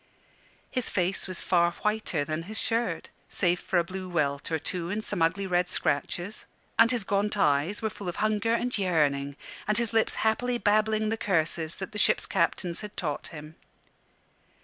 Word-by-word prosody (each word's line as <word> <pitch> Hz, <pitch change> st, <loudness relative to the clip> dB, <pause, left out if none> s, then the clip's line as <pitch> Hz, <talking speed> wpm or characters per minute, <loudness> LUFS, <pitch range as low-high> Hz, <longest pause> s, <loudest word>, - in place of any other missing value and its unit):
His 255 Hz, -2 st, 0 dB
face 185 Hz, +1 st, 0 dB
was 185 Hz, -2 st, -5 dB
far 170 Hz, -1 st, +3 dB
whiter 210 Hz, -8 st, -1 dB
than 155 Hz, +1 st, -2 dB
his 220 Hz, -, -5 dB
shirt, 230 Hz, +1 st, -1 dB, 0.2 s
save 180 Hz, -2 st, +1 dB
for 185 Hz, -, -1 dB
a 170 Hz, -, +4 dB
blue 185 Hz, +1 st, -6 dB
welt 145 Hz, -3 st, -1 dB
or 160 Hz, -, +2 dB
two 170 Hz, +2 st, -3 dB
and 210 Hz, +3 st, -2 dB
some 195 Hz, -5 st, -2 dB
ugly 185 Hz, +5 st, +2 dB
red 180 Hz, -1 st, +1 dB
scratches; 175 Hz, +8 st, -1 dB, 0.3 s
and 230 Hz, -, +8 dB
his 240 Hz, -4 st, +1 dB
gaunt 205 Hz, +2 st, 0 dB
eyes 150 Hz, +4 st, +2 dB
were 220 Hz, -, +1 dB
full 195 Hz, -1 st, -6 dB
of 175 Hz, -, -5 dB
hunger 215 Hz, +1 st, +1 dB
and 245 Hz, +1 st, 0 dB
yearning, 145 Hz, -7 st, +1 dB, 0.3 s
and 210 Hz, -, +2 dB
his 235 Hz, -1 st, -1 dB
lips 225 Hz, 0 st, +2 dB
happily 245 Hz, +3 st, +2 dB
babbling 215 Hz, 0 st, +2 dB
the 225 Hz, -, 0 dB
curses 165 Hz, -4 st, 0 dB
that 190 Hz, +2 st, -6 dB
the 210 Hz, -, -3 dB
ships' -, -, +4 dB
captains 170 Hz, -1 st, 0 dB
had 210 Hz, -1 st, -8 dB
taught 150 Hz, -4 st, -2 dB
him. 155 Hz, -1 st, -9 dB
190 Hz, 180 wpm, -28 LUFS, 165-215 Hz, 0.3 s, and